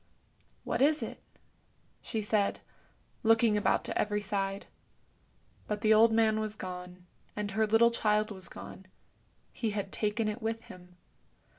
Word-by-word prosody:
" - - -36
What - - -2
is 300 +2 +3
it? - - -7 0.4
" - - -39 0.3
she 220 -3 -3
said, 205 -1 +1 0.6
looking 225 -1 +4
about 205 - +2
to - - -4
every 210 0 0
side. 195 -1 -2 1.0
But 210 -1 -3
the 220 0 +5
old 225 +1 +6
man 220 -1 +3
was 215 -1 -3
gone, 180 -2 -8 0.3
and 210 -1 -3
her 220 +2 +1
little 225 +2 +5
child 215 -2 +1
was 190 -3 -5
gone; 190 - -10 0.7
he 225 - -2
had 205 -2 -3
taken 215 +1 -1
it 215 +3 -3
with 225 0 -3
him. 180 0 -14
210 Hz, 155 wpm, -30 LUFS, 200-225 Hz, 1.0 s, old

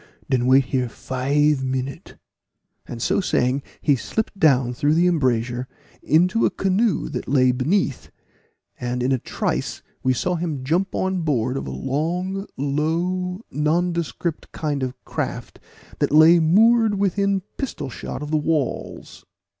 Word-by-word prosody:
"Den 125 -2 +2
wait 130 +1 +5
here 130 -2 -1
five 140 +4 0
minute" 130 +1 -4 0.7
and 120 - -7
so - - +2
saying, 130 -6 +1 0.2
he 145 - +3
slipped 220 - -3
down 130 -7 +3
through 145 +5 +1
the 170 +2 +3
embrasure 125 -7 0 0.3
into 180 - +3
a - - +4
canoe 195 +1 0
that 125 -4 -5
lay 130 -1 +4
beneath, 140 +4 -1 0.7
and 125 0 -2
in 130 - +1
a 130 - +2
trice - - -3 0.2
we 130 - +2
saw 155 +8 0
him 160 -6 -3
jump 175 +8 0
on 190 -1 0
board 130 -5 0
of 135 - -4
a - - -4
long 180 +8 -2
low 175 - -1
nondescript 170 +1 -1
kind 145 -3 -2
of 130 -1 -3
craft - - -5 0.4
that - - +1
lay 160 +3 +7
moored 220 +6 +4
within 200 0 +1 0.2
pistol 150 - -4
shot 140 - -6
of 150 - -6
the 155 - +3
walls. 150 -3 -3
150 Hz, 145 wpm, -22 LUFS, 130-180 Hz, 0.7 s, lay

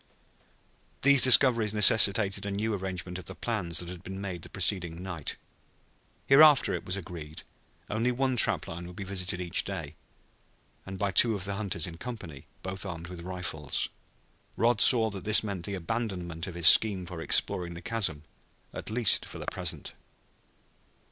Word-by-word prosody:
These 140 -1 +5
discoveries 120 -4 +5
necessitated 100 -1 +5
a 100 - -4
new 105 +3 -3
arrangement 95 -2 -5
of - - -12
the - - -7
plans 95 -8 -3
that 85 0 -3
had 90 -2 -9
been 95 +1 -8
made 95 -4 -6
the - - -9
preceding 90 -3 -2
night. 85 -6 -6 0.9
Hereafter, 145 0 +5
it - - -5
was 95 +2 -2
agreed, 80 -5 -9 0.4
only 115 +4 -1
one 130 +1 -1
trap 120 - +2
line 85 +1 -8
would 90 - -12
be 100 - -7
visited 95 -1 -2
each 90 -2 -2
day, - - -7 0.9
and 95 0 -7
by 100 +1 -2
two 115 +3 +4
of 95 - -4
the 100 +1 -2
hunters 100 -5 -3
in 85 -1 -8
company, 85 - -9 0.2
both 95 +1 -3
armed 85 -3 -8
with 90 -2 -9
rifles. 90 -5 -3 0.7
Rod 115 +1 +2
saw 115 -3 +5
that 95 -2 -8
this 105 +1 +5
meant 100 -5 -5
the 100 - -4
abandonment 90 -3 -5
of 90 - -8
his 85 -2 -3
scheme 95 +1 +7
for 85 -1 -8
exploring 85 +1 +1
the - - -8
chasm, 95 -10 -2 0.5
at - - -8
least 110 -1 +2
for - - -10
the - - -8
present. - - -5
95 Hz, 170 wpm, -27 LUFS, 85-110 Hz, 0.9 s, scheme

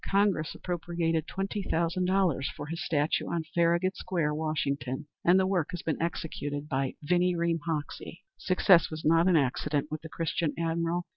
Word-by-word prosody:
Congress 195 -5 +2
appropriated 170 -2 -2
twenty 195 +2 -3
thousand 170 0 0
dollars 180 -7 +2
for 145 - -5
his 165 +3 -4
statue 150 -1 0
on 170 -1 -1
Farragut 170 +2 +2
Square, 165 -5 -1
Washington, 145 -3 -2 0.2
and 180 +2 +5
the 190 - +3
work 185 -5 +1
has 175 -2 -5
been 160 -1 -2
executed 150 -3 -3
by 135 -2 -1
Vinnie 180 +3 +2
Ream 170 0 +1
Hoxie. 165 +3 -4
Success 185 -1 +4
was 155 0 -7
not 165 +3 +5
an 185 - +4
accident 145 +2 0
with 155 0 -4
the 160 - -9
Christian 165 -1 -1
admiral. 170 +1 -1
165 Hz, 165 wpm, -29 LUFS, 155-175 Hz, 0.2 s, and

